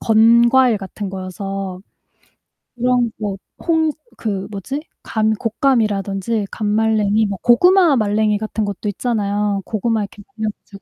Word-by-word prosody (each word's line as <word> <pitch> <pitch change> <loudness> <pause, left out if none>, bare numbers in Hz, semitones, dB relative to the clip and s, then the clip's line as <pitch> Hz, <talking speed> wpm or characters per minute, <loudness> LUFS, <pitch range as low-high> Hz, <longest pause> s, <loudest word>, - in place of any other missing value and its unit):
건과일 235 +1 +5
같은 195 0 -6
거여서 190 0 -5 1.0
그런 245 -1 +1
뭐 205 -3 -3 0.2
콩 320 -2 +1 0.3
그 200 -4 -3
뭐지? 265 +9 -4 0.2
감 220 -1 0
곶감이라든지 215 -3 0
감말랭이, 215 0 +1
뭐 200 -1 -4
고구마말랭이 240 - +4
같은 215 0 -3
것도 205 +1 -4
있잖아요. 205 -2 -1
고구마 220 0 -1
이렇게 205 0 -7 0.2
말려 220 -1 -1
가지고. 200 -1 -15
215 Hz, 290 characters per minute, -19 LUFS, 200-235 Hz, 1.0 s, 건과일